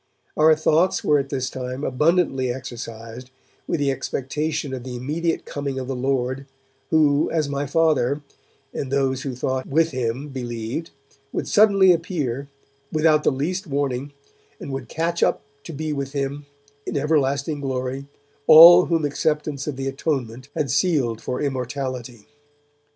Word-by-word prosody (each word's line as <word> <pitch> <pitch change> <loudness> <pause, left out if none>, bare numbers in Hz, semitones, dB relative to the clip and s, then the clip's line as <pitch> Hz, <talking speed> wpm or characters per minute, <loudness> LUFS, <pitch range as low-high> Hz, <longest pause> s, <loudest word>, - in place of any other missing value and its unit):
Our 155 +1 +5
thoughts 160 +3 +2
were 150 -1 +3
at 135 0 -4
this 130 -2 -2
time 130 +1 -5
abundantly 135 -2 +1
exercised 120 -1 -8 0.4
with 165 - -1
the 140 -1 +1
expectation 140 +2 -3
of 130 -2 -5
the 125 -1 -6
immediate 155 +7 -2
coming 140 -2 -4
of 130 -1 -4
the 135 - -3
Lord, 130 +1 -1 0.4
who, 150 -2 +3
as 155 -3 0
my 140 0 -2
Father 145 -2 +1 0.5
and 135 - -4
those 135 -2 +1
who 130 -2 -4
thought 130 +1 -2
with 165 +3 +2
him 130 +2 -3
believed, 120 +3 -5 0.4
would - - -3
suddenly 200 -3 +5
appear, 150 -6 -2 0.4
without 155 -1 +3
the - - +3
least 175 +8 -2
warning, 140 -1 -2 0.5
and - - -7
would 135 -3 -5
catch 170 +1 -2
up - - +2 0.2
to - - -7
be 155 0 -3
with 140 -1 -4
Him 140 +1 -3 0.4
in - - -3
everlasting 140 0 0
glory 130 0 -3 0.4
all 175 +3 +10
whom 165 -3 +1
acceptance 150 -1 -1
of 150 - -2
the 135 +1 -4
Atonement 135 -3 -3
had 140 -5 -1
sealed 140 - +1
for 125 - -3
immortality. 130 -4 -4
140 Hz, 150 wpm, -23 LUFS, 130-155 Hz, 0.5 s, all